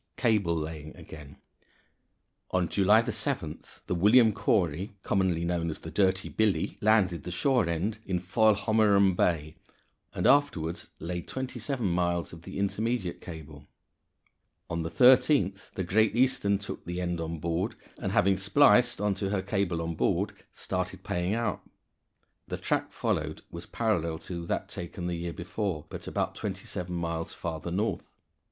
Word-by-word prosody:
Cable 105 -8 +2
Laying 75 -1 -5
again. 75 -2 -11 1.1
On 90 -2 +1
July 105 +5 +4
7th - - -4
the - - -2
William 110 +5 +5
Cory 95 -3 0
commonly 90 -4 +1
known 85 -1 -1
as 80 - -6
the - - -8
Dirty 95 -1 +2
Billy 105 -7 0
landed 100 -6 +3
the - - -6
shore 115 +2 +2
end 100 +7 -1
in 95 -4 -1
Foilhommerum 100 0 +3
Bay, 80 -4 0 0.6
and - - -1
afterward 90 - +3 0.2
laid 85 +1 -5
twenty 130 -1 -5
seven 135 -6 -2
miles 85 -1 0
of 85 - -10
the - - -8
intermediate 100 -1 -1
cable. 75 -3 -10 1.0
On 85 0 -1
the 80 - -3
13th, 110 - +4
the 95 - -1
Great 110 +5 +2
Eastern 120 -5 +3
took 100 - -7
the 90 +1 -4
end 85 -2 -2
on 80 0 -4
board, 85 +3 -2 0.3
and - - -1
having 95 +1 +3
spliced 100 +1 +4
on 105 0 +1
to 95 0 -3
her 100 -2 -1
cable 95 -4 -1
on 85 0 -3
board, - - 0 0.2
started - - -4
paying 90 +4 -1
out. 115 -5 -1 0.9
The - - -4
track - - -1
followed - - -2
was 85 0 -7
parallel 85 -8 0
to 85 -2 -5
that - - -2
taken 85 +1 -6
the 90 - -1
year 85 0 -3
before, 95 -8 -3
but - - -8
about - - -1
twenty - - -5
seven 90 0 -5
miles 85 -1 -3
farther 85 0 -4
north. 100 +6 -2
90 Hz, 155 wpm, -28 LUFS, 85-105 Hz, 1.1 s, William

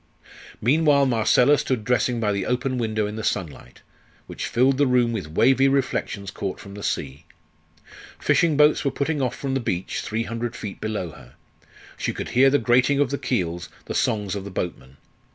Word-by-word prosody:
Meanwhile 145 +3 +4
Marcella 125 +3 +4
stood 125 -5 -1
dressing 125 +1 +1
by 105 -2 +1
the 100 -2 -2
open 125 +1 -1
window 110 -2 -1
in 105 +1 -5
the 110 - -4
sunlight, 80 -13 -4 0.4
which - - -5
filled 130 +3 +2
the 145 - +4
room 125 -2 +3
with 100 -9 -4
wavy 135 +8 +4
reflections 125 -7 -1
caught 95 -2 -5
from 100 - -11
the 105 - -8
sea. 70 -3 -4 0.9
Fishing 165 -4 +2
boats 150 0 +4
were 140 - +2
putting 145 +2 -2
off 125 -3 -1
from 135 -1 -3
the 135 - +1
beach, 90 -7 -3
three 110 +2 -2
hundred 115 0 -4
feet 100 -2 -7
below 105 -6 -3
her; - - -16 0.6
she - - -2
could - - -5
hear 135 +2 +5
the 145 - +3
grating 125 +4 +3
of 145 -4 +2
the 140 - -2
keels, 90 -10 -2 0.2
the - - -5
songs 105 -3 0
of 100 -2 -4
the 100 - -7
boatmen. 75 -8 -5
115 Hz, 190 wpm, -23 LUFS, 100-135 Hz, 0.9 s, hear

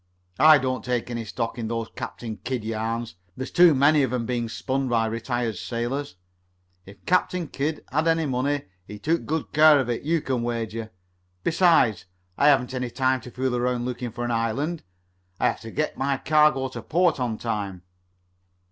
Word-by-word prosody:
I 155 0 +8
don't 130 -2 -2
take 125 -1 -2
any 115 -1 -3
stock 115 +1 -4
in 115 - -3
those 115 0 -3
Captain 110 -3 -6
Kidd 125 -3 -4
yarns. 110 -3 -3 0.2
There's 130 +1 -5
too 175 -3 +6
many 145 +3 +4
of 130 -3 0
'em 125 -2 -1
being 120 -1 -2
spun 135 +3 -2
by 115 -2 +2
retired 115 -1 -2
sailors. 120 +7 -3 0.7
If 100 -1 -15
Captain 180 -1 +1
Kidd 150 +2 -3
had 155 +4 +1
any 165 -1 +2
money, 135 +2 -1 0.2
he 105 - -8
took 165 +10 -1
good 160 0 -3
care 150 -1 +7
of 125 -3 -1
it, 115 - -2
you 165 +3 +1
can 130 -4 -1
wager. 115 -2 -3 0.5
Besides, 165 - +3 0.3
I 145 - +3
haven't 135 -3 +3
any 125 -1 -2
time 130 +1 +1
to 125 - -10
fool 125 0 -2
around 125 0 0
looking 125 -1 -4
for 120 +2 -4
an 120 - -2
island. 125 +9 -1 0.6
I - - +1
have - - 0
to 115 - -8
get 150 +7 -2
my 135 0 +1
cargo 150 -3 +3
to - - -7
port 175 -2 +1
on 120 -3 -1
time." 100 -6 -4
125 Hz, 185 wpm, -25 LUFS, 115-145 Hz, 0.7 s, I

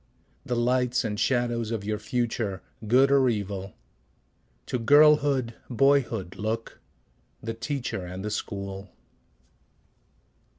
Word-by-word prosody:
The 125 - -2
lights 125 +1 +1
and 105 -2 -3
shadows 120 -3 0
of 115 -3 -3
your 105 0 -2
future, 110 -3 -2 0.2
good 130 +5 +5
or 135 -2 +5
evil? 100 -3 -4 0.9
To 125 - -2
girlhood, 145 -2 +5 0.2
boyhood 125 -7 +1
look, 110 +3 -4 0.6
the 115 - -4
teacher 120 -4 -4
and 90 +2 -6
the 105 - -3
school. 100 -2 -5
115 Hz, 110 wpm, -26 LUFS, 105-130 Hz, 0.9 s, good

